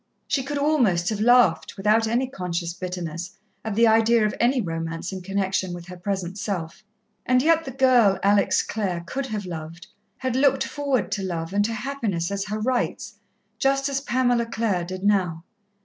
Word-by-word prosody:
She 275 - +1
could 285 +2 -4
almost 245 - +2
have 215 -2 -2
laughed, 245 0 +4
without 215 +3 +3
any 240 +4 +1
conscious 180 -8 -4
bitterness, 180 +1 -6 0.3
at 220 -2 -3
the 230 +2 +5
idea 225 0 +4
of 210 - 0
any 250 +3 +3
romance 165 -3 -4
in 190 - -5
connection 190 -1 -1
with 175 -1 -9
her 180 - -7
present 190 +1 -4
self. 190 -1 -4 0.4
And 255 0 +3
yet 325 +1 +3
the 265 - -5
girl, 245 -7 +4
Alex 200 0 +3
Clare, 185 -5 -3
could 265 +10 -4
have 210 -4 -4
loved 170 0 -7 0.3
had 260 -2 -2
looked 270 0 +3
forward 275 -8 -1
to 210 -2 -1
love 170 -1 -4
and 205 0 +3
to 225 - -2
happiness 215 -8 -2
as 200 0 -2
her 210 +1 -3
rights, 250 +3 -2 0.4
just 275 +1 +2
as 275 0 -1
Pamela 245 -3 +1
Clare 215 -6 -1
did 185 +1 -6
now. 185 -5 +1
210 Hz, 180 wpm, -24 LUFS, 180-250 Hz, 0.4 s, the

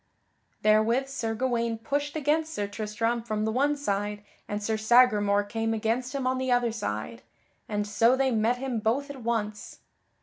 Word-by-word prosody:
Therewith 220 +5 +3
Sir 230 -5 -3
Gawaine 235 -2 0
pushed 285 +6 -2
against 310 +2 0
Sir 205 - -1
Tristram 220 +3 -2
from 215 -2 -2
the 220 - 0
one 285 +5 +1
side, 205 -5 -2 0.2
and 205 0 -3
Sir 220 +1 0
Sagramore 215 -3 +4
came 225 +2 -2
against 235 +4 -1
him 270 -2 -2
on 255 0 +1
the 260 -1 -1
other 245 -1 +2
side, 115 - -4 0.5
and 210 -1 -1
so 230 +4 +3
they 265 0 +1
met 230 +2 +2
him 255 -3 -2
both 260 +7 0
at 270 -3 -10
once. 215 -3 -3
230 Hz, 170 wpm, -27 LUFS, 215-255 Hz, 0.5 s, Sagramore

